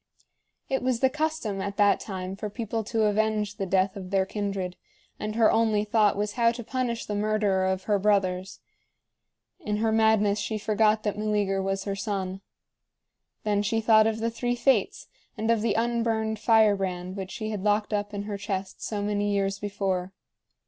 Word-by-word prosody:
It 265 - -1
was 250 -2 0
the 265 0 +3
custom 305 -10 -2
at 200 +1 -4
that 205 -1 +4
time 190 -2 -5
for 210 +2 -5
people 225 +1 -3
to 225 0 0
avenge 210 -1 +1
the 195 -3 -2
death 190 +1 +1
of 190 -2 -7
their 195 -1 +2
kindred, 195 -3 -3 0.4
and 215 0 -4
her 225 -1 +5
only 220 -2 +2
thought 210 -1 +2
was 205 0 -1
how 230 +1 +3
to 240 0 -7
punish 240 -1 -2
the 210 - -4
murderer 205 -2 +1
of 190 0 -1
her 205 -1 +1
brothers. 190 -2 0 1.0
In 210 - -2
her 220 +1 +1
madness 220 -2 +3
she 210 +1 -2
forgot 215 0 +2
that 210 -1 -2
Meleager 205 -2 0
was 195 0 -2
her 200 -1 -3
son. 195 -2 -3 1.0
Then 205 -1 +1
she 225 +2 0
thought 220 -1 +5
of 220 -1 0
the 230 0 0
three 245 +1 -1
Fates 240 -5 +1 0.3
and 220 +2 +1
of 230 -2 +2
the 230 - +1
unburned 225 -2 0
firebrand 195 -5 +2
which 190 -2 -5
she 215 +1 -4
had 210 -3 -3
locked 210 +1 +1
up 205 0 -1
in 200 -1 -4
her 205 -1 -5
chest 195 -1 -4
so 205 -2 -3
many 205 0 0
years 195 0 0
before. 195 -2 -2
210 Hz, 185 wpm, -27 LUFS, 195-220 Hz, 1.0 s, her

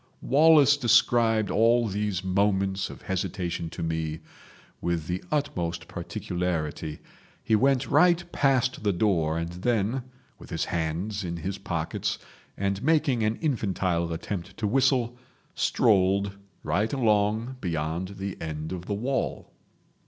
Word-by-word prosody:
Wallace 145 0 +6
described 115 -3 +3
all 115 +2 +4
these 100 -2 -2
moments 95 0 +1
of - - -11
hesitation 90 -3 -3
to - - -6
me 80 -1 -2 0.6
with 85 -2 -1
the 90 +2 -3
utmost 90 - -2
particularity. 80 -4 -3 0.5
He 110 - +3
went 135 +3 +2
right 175 +4 +4
past 130 -2 +1
the 105 -2 +1
door, 85 -5 +1
and 85 0 -2
then, 115 +6 -1 0.3
with - - -13
his - - -1
hands 90 +6 -2
in 85 -1 -4
his 95 +4 -4
pockets, 80 -2 -2 0.4
and 100 0 -1
making 145 -4 +2
an 110 +1 +1
infantile 95 - 0
attempt 85 +2 -5
to 110 - -2
whistle, 125 0 +2 0.3
strolled 100 -1 +2 0.3
right 100 +9 0
along 110 0 +1
beyond 85 +3 -3
the 95 -1 -5
end 80 0 -5
of 90 -1 -6
the 100 - -1
wall. 130 +6 -2
100 Hz, 130 wpm, -27 LUFS, 85-120 Hz, 0.6 s, Wallace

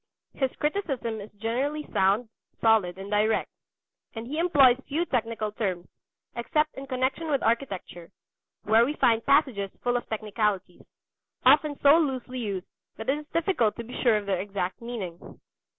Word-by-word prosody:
His 265 -2 0
criticism 275 - -2
is 205 - -9
generally 260 +8 -2
sound, 200 +5 +2 0.3
solid, 215 -6 +3
and 195 +1 -8
direct; 215 +1 +1 0.6
and 225 +1 -5
he 295 +6 -4
employs 275 -8 +5
few 320 +5 0
technical 225 -6 -2
terms, 185 -5 -3 0.5
except 300 +6 0
in 270 0 -8
connection 265 +5 -1
with 280 -3 +1
architecture, 200 -8 -2 0.5
where 220 +2 +5
we 285 +5 -1
find 230 -4 +3
passages 265 -9 +2
full 245 0 +1
of 245 - -3
technicalities, 210 -4 -2 0.6
often 290 +2 +5
so 290 +3 +7
loosely 255 -4 -2
used 200 -5 -3 0.3
that 220 +3 -5
it 280 - +2
is 300 - -12
difficult 325 - +1
to 235 - -6
be 240 +2 -7
sure 235 -4 +4
of 210 - -4
their 195 -2 0
exact 190 -1 -4
meaning. 210 -8 -7
235 Hz, 155 wpm, -27 LUFS, 210-275 Hz, 0.6 s, so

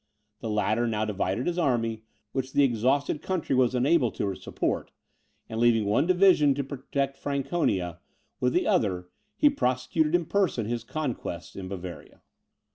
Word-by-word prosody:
The 115 - -4
latter 110 +2 +1
now 110 -1 0
divided 100 +2 -1
his 175 0 -1
army, 115 -7 0 0.3
which 130 0 -3
the 145 - +4
exhausted 135 +4 +1
country 170 -6 -1
was 130 -1 +3
unable 130 +1 +3
to 100 -1 -2
support, - - -3 0.6
and 110 - -4
leaving 115 -2 +4
one 110 +10 +2
division 180 -6 +5
to 140 - -1
protect 135 0 -3
Franconia, 130 - -1 0.4
with 125 0 +1
the - - +2
other 90 -4 +1 0.3
he 300 - +4
prosecuted 150 - +1
in 175 -1 +1
person 185 - +1
his 115 +1 -3
conquests 115 - -4
in 95 -1 -6
Bavaria. 90 -2 -8
125 Hz, 150 wpm, -27 LUFS, 110-145 Hz, 0.6 s, division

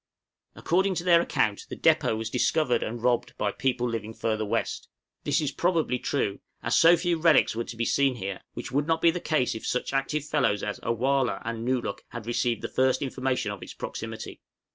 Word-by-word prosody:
According 190 +2 +1
to 170 - -2
their 170 -2 +5
account 105 -10 0
the - - -5
depôt 110 - +3
was 110 0 -4
discovered 125 -1 +2
and 120 +1 -4
robbed 125 -1 +1
by 105 - 0
people 125 -2 0
living 110 -1 -4
further 110 -1 -1
west. 105 - -2 0.4
This - - +2
is 150 -3 -1
probably 165 -7 +1
true, 105 -8 -1 0.2
as - - +1
so 170 +1 +7
few 170 -1 0
relics 160 -7 +4
were 115 +1 -2
to 115 - -8
be 115 - 0
seen 135 0 +2
here, 95 -4 -5
which - - -6
would 145 +3 0
not 160 0 0
be 170 - +7
the 175 - -4
case 155 -7 0
if 110 - -6
such 125 - -1
active 135 +2 -1
fellows 130 -9 +1
as 105 - -3
A - - -2
wăh 130 +3 +2
lah - - -3
and 115 0 -4
Nōo 130 -1 +1
luk 100 - -4
had 120 -3 -8
received 120 0 -1
the - - -1
first 130 +2 +1
information 130 -5 -1
of 100 - -7
its - - -9
proximity. 110 0 -6
125 Hz, 215 wpm, -27 LUFS, 115-150 Hz, 0.4 s, so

